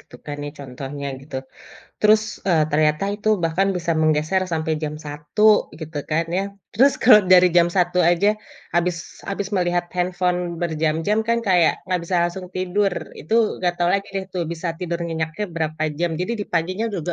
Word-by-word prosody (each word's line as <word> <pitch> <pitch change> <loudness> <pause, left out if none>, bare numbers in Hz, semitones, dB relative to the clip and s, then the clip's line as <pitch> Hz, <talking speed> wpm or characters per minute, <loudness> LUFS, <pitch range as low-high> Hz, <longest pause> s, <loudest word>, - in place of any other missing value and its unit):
gitu 125 - -15
kan 145 -1 -5
ya - - -5
contohnya 140 +1 -7
gitu. 135 0 -8 0.6
Terus, 215 0 +5 0.3
eee, 160 -3 +4
ternyata 155 +2 +2
itu 210 +1 -3 0.2
bahkan 170 +4 +1
bisa 170 -1 -1
menggeser 155 +4 +2
sampe 160 0 -1
jam 150 0 -2
1 150 +9 +2
gitu 160 -1 -6
kan 165 +2 +1
ya. 180 +3 0 0.3
Terus 270 +6 +5
kalau 225 -3 +8
dari 180 0 +7
jam 170 0 +6
1 180 -1 +1
aja, 175 +4 +3 0.5
abis 175 0 +1 0.3
abis 195 0 -3
melihat 175 -1 +1
handphone 180 0 0 0.2
berjam-jam 160 +4 0
kan 235 - +3
kayak 175 -3 +3
nggak 180 -1 0
bisa 180 - -3
langsung 180 +1 -8
tidur, 185 +2 0 0.2
itu 160 - -3 0.3
gak 175 -1 +1
tau 175 - +3
lagi 195 +2 0
deh 195 -1 -3
tuh 185 -2 -3
bisa 165 0 -4
tidur 175 -1 -3
nyenyaknya 165 +3 -3
berapa 155 -1 -2 0.2
jam, 175 0 0
jadi 185 +6 -1
di - - -2
paginya 185 +6 0
juga 175 -3 -3
175 Hz, 175 wpm, -22 LUFS, 155-190 Hz, 0.6 s, kalau